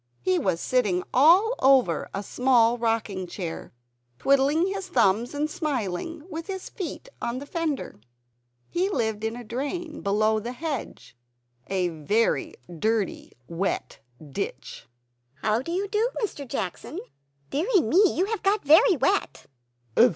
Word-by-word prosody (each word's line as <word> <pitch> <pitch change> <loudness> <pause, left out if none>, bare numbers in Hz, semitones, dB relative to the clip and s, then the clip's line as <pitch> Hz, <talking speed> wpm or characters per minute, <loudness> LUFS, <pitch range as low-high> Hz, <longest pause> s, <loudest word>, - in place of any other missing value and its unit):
He 185 +4 +2
was 185 -4 0
sitting 205 -8 +1
all 350 - +6
over 260 - +3
a 195 - -4
small 240 0 +3
rocking 225 -5 -1
chair, 175 -2 -6 0.5
twiddling 275 - +3
his 390 0 -3
thumbs 235 - +2
and 295 +1 0
smiling, 295 - -3
with 325 -2 -6
his 380 -2 -6
feet 390 +5 -6
on 235 +1 -2
the 275 - -6
fender. 305 - -3 0.7
He 365 +3 0
lived 220 - -1
in 225 +1 -1
a 245 - -7
drain 290 +8 -4
below 215 +2 +2
the 235 +3 -5
hedge, 295 - -5 0.5
in 195 - -3
a 180 -2 +1
very 220 +8 +1 0.2
dirty 220 -1 -1
wet 175 +4 -3 0.3
ditch. 135 - -5 0.6
"How 215 +2 +2
do 335 - -6
you 385 +3 -1
do, 430 +4 +1
Mr. 290 -9 -4
Jackson? 195 -6 -4 0.5
Deary 370 - +2
me, 320 - +3 0.2
you 365 - +3
have 450 +1 -3
got 395 -3 +1
very 350 - +6
wet!" 245 - 0
255 Hz, 140 wpm, -26 LUFS, 210-330 Hz, 0.7 s, all